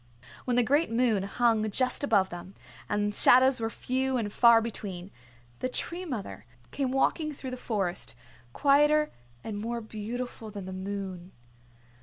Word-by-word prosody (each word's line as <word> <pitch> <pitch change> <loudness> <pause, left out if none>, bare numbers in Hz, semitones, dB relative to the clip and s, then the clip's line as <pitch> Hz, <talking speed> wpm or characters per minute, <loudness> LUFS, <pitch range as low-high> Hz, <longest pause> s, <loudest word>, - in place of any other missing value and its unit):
When 250 - 0
the 245 - +4
great 290 +7 +2
moon 230 -3 +2
hung 220 +2 +1
just 255 +6 0
above 200 -8 +2
them, 175 +2 -9 0.3
and 205 0 0
shadows 255 +4 +6
were 225 0 -1
few 260 +2 -1
and 210 -3 -3
far 235 -1 +7
between, 200 -5 -6 0.5
the 255 - -2
Tree 345 +7 -3
Mother 200 - -6 0.2
came 275 -2 -1
walking 305 +4 +1
through 260 -1 -7
the - - -3
Forest, 190 - -2 0.4
quieter 295 - +3 0.3
and 210 -2 -5
more 235 +2 -3
beautiful 225 +1 -6
than 200 -2 -7
the 190 - -6
moon. 190 -1 -6
230 Hz, 150 wpm, -28 LUFS, 200-255 Hz, 0.5 s, far